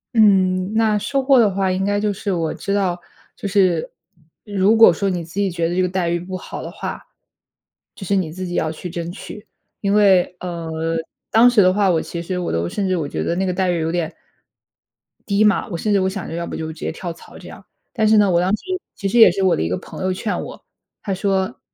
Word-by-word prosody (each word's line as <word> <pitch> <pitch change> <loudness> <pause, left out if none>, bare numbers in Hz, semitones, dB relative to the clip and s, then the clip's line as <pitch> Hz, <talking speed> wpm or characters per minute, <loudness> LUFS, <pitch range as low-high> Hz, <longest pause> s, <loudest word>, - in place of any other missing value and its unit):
嗯， 190 -3 +3
那 220 -1 +2
收 275 +6 -1
获 270 0 +4
的 220 -3 +5
话 190 -1 0
应 190 +1 -1
该 205 0 +1
就 210 0 0
是， 200 +1 -3
我 165 -3 -1
知 200 - -4
道 185 -3 0 0.4
就 - - -5
是 185 -5 +1 0.5
如 205 0 +2
果 225 0 +8
说 200 - -2
你 180 -3 -1
自 165 +2 -14
己 200 -2 +1
觉 165 -1 -1
得 175 - -2
这 185 - +2
个 - - +1
待 180 -2 -1
遇 175 0 0
不 185 +2 -7
好 185 - -7
的 - - -7
话， - - -6 0.9
就 - - -10
是 200 - +1
你 180 -5 -1
自 185 +2 -6
己 175 - -5
要 160 - 0
去 170 +3 -7
争 170 0 -5
取。 210 +3 -10 0.3
因 200 -1 +1
为， 190 -4 +4
呃， 165 -2 -3 0.3
当 230 +2 +6
时 240 -4 +4
的 185 -1 +5
话 200 -1 +2
我 165 -2 +1
其 170 - -6
实 180 +1 -3
我 175 - -3
都 85 +1 -1
甚 195 - -2
至 185 - +1
我 155 -4 -2
觉 - - -3
得 170 - -1
那 190 +2 0
个 185 - -1
待 185 0 0
遇 175 - -1
有 160 0 -1
点 170 -2 -2 1.1
低 200 0 +2
嘛。 210 -2 +2
我 175 - -4
甚 210 +5 0
至 200 - +4
我 190 0 +1
想 190 -1 -6
着 - - -7
要 170 0 -4
不 - - -6
就 160 - -4
直 155 - -16
接 - - -3
跳 170 +1 -6
槽 165 - -15
这 - - -12
样。 - - -12 0.3
但 220 -3 +1
是 215 0 +5
呢， 205 -2 +4
我 170 - +3
当 180 - +1
时 - - -19 0.3
其 200 - -3
实 235 +5 +2
也 225 - +9
是 195 +2 -2
我 185 - +4
的 - - -2
一 80 - -1
个 90 - -1
朋 - - -10
友 185 - +1
劝 205 +3 -3
我， - - -10 0.4
他 200 - -2
说 195 +3 -1
185 Hz, 275 characters per minute, -20 LUFS, 170-205 Hz, 1.1 s, 也